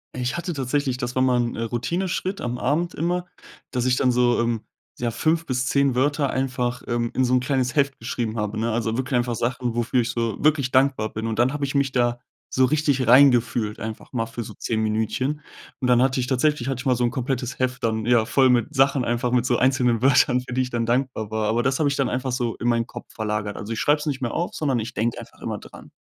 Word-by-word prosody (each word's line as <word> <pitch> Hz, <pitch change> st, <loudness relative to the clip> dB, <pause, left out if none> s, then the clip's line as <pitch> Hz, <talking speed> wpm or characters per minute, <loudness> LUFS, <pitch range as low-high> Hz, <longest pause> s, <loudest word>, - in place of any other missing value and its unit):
Ich 125 Hz, 0 st, -2 dB
hatte 175 Hz, +1 st, -3 dB
tatsächlich 135 Hz, -1 st, -1 dB
das 125 Hz, -1 st, -4 dB
war 130 Hz, -, +2 dB
mal 130 Hz, -1 st, +3 dB
'n, 120 Hz, -1 st, -1 dB
äh, -, -, -4 dB
Routineschritt 175 Hz, -, -2 dB
am 125 Hz, 0 st, -3 dB
Abend 155 Hz, +8 st, -1 dB
immer, 175 Hz, +2 st, -1 dB, 0.5 s
dass 125 Hz, -2 st, -1 dB
ich 125 Hz, -1 st, +3 dB
dann 130 Hz, 0 st, +2 dB
so, 120 Hz, -1 st, +2 dB
ähm, 115 Hz, -2 st, -1 dB, 0.4 s
ja, 120 Hz, -1 st, -1 dB
5 160 Hz, +7 st, 0 dB
bis 125 Hz, -2 st, -1 dB
10 140 Hz, -1 st, +2 dB
Wörter 145 Hz, +2 st, +1 dB
einfach, 125 Hz, -2 st, -2 dB
ähm, 120 Hz, -1 st, -1 dB
in 130 Hz, -, +1 dB
so 125 Hz, 0 st, +1 dB
'n -, -, +4 dB
kleines 130 Hz, +1 st, -1 dB
Heft 140 Hz, -2 st, +1 dB
geschrieben 115 Hz, -1 st, -3 dB
habe, 105 Hz, 0 st, -2 dB
ne? 115 Hz, +1 st, 0 dB
Also, 115 Hz, 0 st, -1 dB
wirklich 130 Hz, 0 st, -1 dB
einfach 120 Hz, -1 st, 0 dB
Sachen, 120 Hz, +1 st, -2 dB
wofür 120 Hz, +2 st, +1 dB
ich 115 Hz, -, -3 dB
so 115 Hz, -2 st, -2 dB
wirklich 145 Hz, -4 st, +2 dB
dankbar 130 Hz, -5 st, +2 dB
bin. 110 Hz, +1 st, -3 dB
Und 110 Hz, -1 st, -3 dB
dann 125 Hz, +4 st, +2 dB
habe 145 Hz, -, -3 dB
ich 140 Hz, 0 st, -2 dB
mich 140 Hz, -1 st, +2 dB
da 120 Hz, -1 st, +1 dB, 0.3 s
so 130 Hz, -, +4 dB
richtig 140 Hz, -1 st, +1 dB
rein 130 Hz, +4 st, +8 dB
gefühlt, 120 Hz, -3 st, -1 dB
einfach 110 Hz, 0 st, -7 dB
mal 115 Hz, -3 st, -1 dB
für 115 Hz, +1 st, -6 dB
so -, -, -9 dB
10 110 Hz, -1 st, -2 dB
Minütchen. 110 Hz, +7 st, -1 dB, 0.4 s
Und 130 Hz, -, -1 dB
dann 125 Hz, -1 st, +4 dB
hatte 130 Hz, 0 st, +2 dB
ich 125 Hz, -, 0 dB
tatsächlich 130 Hz, 0 st, +1 dB
hatte 135 Hz, -2 st, -2 dB
ich -, -, -12 dB
mal 130 Hz, -, +4 dB
so 125 Hz, -, -1 dB
'n 120 Hz, -, +1 dB
komplettes 130 Hz, -1 st, -3 dB
Heft 130 Hz, 0 st, -1 dB
dann, 110 Hz, -1 st, 0 dB
ja, 120 Hz, -2 st, +4 dB
voll 130 Hz, +3 st, +3 dB
mit 125 Hz, +5 st, +2 dB
Sachen 135 Hz, -1 st, +3 dB
einfach, 120 Hz, +1 st, 0 dB
mit 125 Hz, -1 st, +2 dB
so 120 Hz, -1 st, +2 dB
einzelnen 125 Hz, -3 st, +2 dB
Wörtern, 130 Hz, -1 st, +4 dB
für 125 Hz, -, -8 dB
die 130 Hz, -, +2 dB
ich 125 Hz, -, -6 dB
dann 115 Hz, -1 st, -1 dB
dankbar 125 Hz, -3 st, -1 dB
war. 110 Hz, -1 st, -1 dB
Aber 115 Hz, +2 st, +2 dB
das 130 Hz, +2 st, +1 dB
habe 155 Hz, -, +2 dB
ich 140 Hz, -, 0 dB
dann 135 Hz, -, 0 dB
einfach 130 Hz, +1 st, -2 dB
so 120 Hz, -2 st, -1 dB
in 120 Hz, -, -3 dB
meinen 115 Hz, -1 st, +1 dB
Kopf 120 Hz, -1 st, -9 dB
verlagert. 105 Hz, -2 st, -3 dB
Also, 110 Hz, +2 st, -5 dB
ich 110 Hz, -, -4 dB
schreibe 150 Hz, +1 st, +3 dB
es 150 Hz, -, -6 dB
nicht 135 Hz, -3 st, -2 dB
mehr 120 Hz, -, -2 dB
auf, 175 Hz, -, -2 dB
sondern 135 Hz, -6 st, 0 dB
ich 115 Hz, +2 st, -6 dB
denke 115 Hz, +2 st, -1 dB
einfach -, -, -13 dB
immer -, -, -4 dB
dran. -, -, -14 dB
125 Hz, 255 wpm, -23 LUFS, 120-135 Hz, 0.5 s, rein